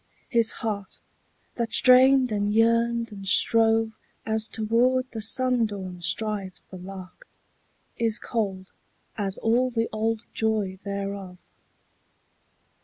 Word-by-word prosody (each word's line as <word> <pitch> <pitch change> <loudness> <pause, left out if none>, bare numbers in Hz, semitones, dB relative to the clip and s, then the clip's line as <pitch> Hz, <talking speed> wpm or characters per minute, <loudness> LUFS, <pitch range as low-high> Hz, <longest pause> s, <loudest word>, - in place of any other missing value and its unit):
His 230 -2 +2
heart, 200 -3 -4 0.6
that 230 -2 -2
strained 255 0 +6
and 205 0 0
yearned 230 +1 +2
and 195 -2 -9
strove 225 +2 +3 0.3
As 220 0 0
toward 240 +4 +1
the 225 - -5
sundawn 215 -7 0
strives 195 +1 -2
the 185 - -11
lark, 190 - -11 0.7
Is 225 -1 0
cold 195 -6 -3 0.4
as 200 -2 -1
all 240 +3 +2
the 230 -2 -1
old 220 +1 -1
joy 210 -4 -1
thereof. 200 -2 -5
220 Hz, 110 wpm, -25 LUFS, 200-230 Hz, 0.7 s, strained